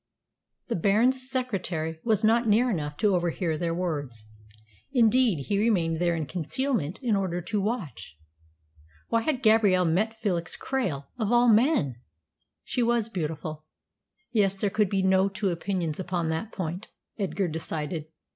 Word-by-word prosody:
The 235 - -2
Baron's 245 +8 +2
secretary 180 - -2
was 220 -1 +2
not 230 +2 +3
near 235 +4 +3
enough 150 -6 -3
to 210 -3 +2
overhear 175 -1 -1
their 165 +1 -2
words. 145 -11 -3 0.7
Indeed, 230 - +3
he 200 -1 0
remained 175 -8 +1
there 170 -1 +2
in 160 -2 -2
concealment 185 - -2
in 230 -4 +2
order 185 -3 -1
to 200 +4 -2
watch. 155 - -4 0.9
Why 230 - +2
had 265 +1 -1
Gabrielle 210 -5 +4
met 210 +7 +1
Felix 180 -7 -2
Krail 190 - -2
of 220 -1 0
all 240 0 +5
men? 215 - +2 0.7
She 250 - -2
was 235 -1 +1
beautiful. 155 -4 -4 0.7
Yes, 200 -4 +2
there 195 +1 0
could 210 -2 +2
be 195 -1 0
no 190 +1 +3
two 190 0 -1
opinions 170 -2 -2
upon 175 -3 -2
that 160 +8 -3
point, 180 +3 -4 0.3
Edgar 195 -1 -1
decided. 160 -1 -4
190 Hz, 145 wpm, -27 LUFS, 165-225 Hz, 0.9 s, all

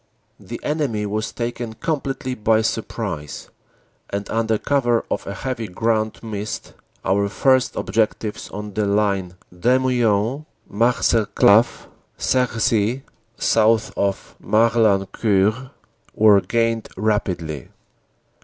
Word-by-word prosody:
The - - -8
enemy 140 -9 -1
was 105 +1 -2
taken 120 -1 -4
completely 135 -2 -3
by 110 -1 +2
surprise, 100 -9 -4 0.6
and 100 0 -4
under 110 -1 +1
cover 120 -3 +1
of - - -2
a 100 - -4
heavy 120 -1 -4
ground 110 +4 -1
mist 105 -1 -5 0.3
our 100 +1 +1
first 130 +4 +2
objectives 110 -1 -1
on 105 0 -7
the 105 0 0
line 100 -3 0 0.2
Demuin 125 - +1 0.2
Marcelcave 115 -1 +3 0.3
Cerisy, 120 -1 +1 0.3
south 110 0 +2
of 100 -1 -2
Morlancourt, 110 +1 +2 0.5
were 105 -2 +6
gained 115 0 0
rapidly. 90 - -1
110 Hz, 100 wpm, -21 LUFS, 100-120 Hz, 0.6 s, were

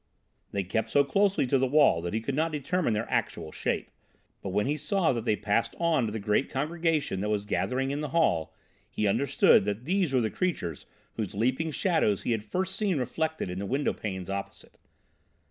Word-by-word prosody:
They 100 - -1
kept 110 +4 -2
so 140 - +4
closely 195 +4 +2
to 135 +1 +2
the 130 - +2
wall 140 - +4
that 85 +4 -3
he 110 - 0
could 135 +5 -3
not 160 +4 0
determine 155 -1 0
their 110 +2 -2
actual 80 - -2
shape, - - -2 0.5
but 100 - -4
when 105 +3 +1
he 145 +3 0
saw 190 +2 +1
that 115 -2 -3
they 110 - +2
passed 105 +2 0
on 165 -8 +2
to - - -4
the 110 - -3
great 105 +4 0
congregation 155 - -1
that 105 - -1
was 105 -1 -1
gathering 135 +5 -1
in 145 - -2
the 150 -1 -3
hall, 110 - +1 0.4
he 105 - -2
understood 125 +4 +4
that 105 +4 -3
these 185 -2 +1
were 130 -2 +3
the 110 - -1
creatures 90 - -2 0.3
whose 105 -4 -3
leaping 130 +9 0
shadows 160 - +1
he - - -1
had 110 -2 0
first 190 - -2
seen 200 -6 0
reflected 160 +4 -2
in 90 +1 -4
the 100 - -4
windowpanes 105 -8 -2
opposite. 100 0 -6
130 Hz, 200 wpm, -28 LUFS, 105-160 Hz, 0.5 s, so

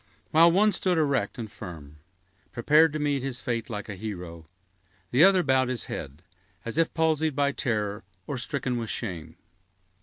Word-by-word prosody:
While 165 +2 +6
one 210 +4 +4
stood 185 -3 +1
erect 140 -4 0
and 110 -3 -6
firm, 80 -7 -10 0.5
prepared 150 +6 +4
to - - -1
meet 145 -2 0
his 130 -1 -4
fate 120 -2 -3
like 105 -3 -5
a 105 - -5
hero, 90 -5 -7 0.6
the 130 +6 +5
other 190 -1 +6
bowed 130 -3 +2
his 125 -3 -2
head, 75 +6 -7 0.4
as 115 +7 -2
if 165 - +2
palsied 160 -2 +1
by 140 0 +2
terror 105 -8 -2 0.2
or 140 -3 -4
stricken 125 0 -2
with 115 -2 -4
shame. 85 -8 -5
125 Hz, 170 wpm, -26 LUFS, 105-155 Hz, 0.6 s, While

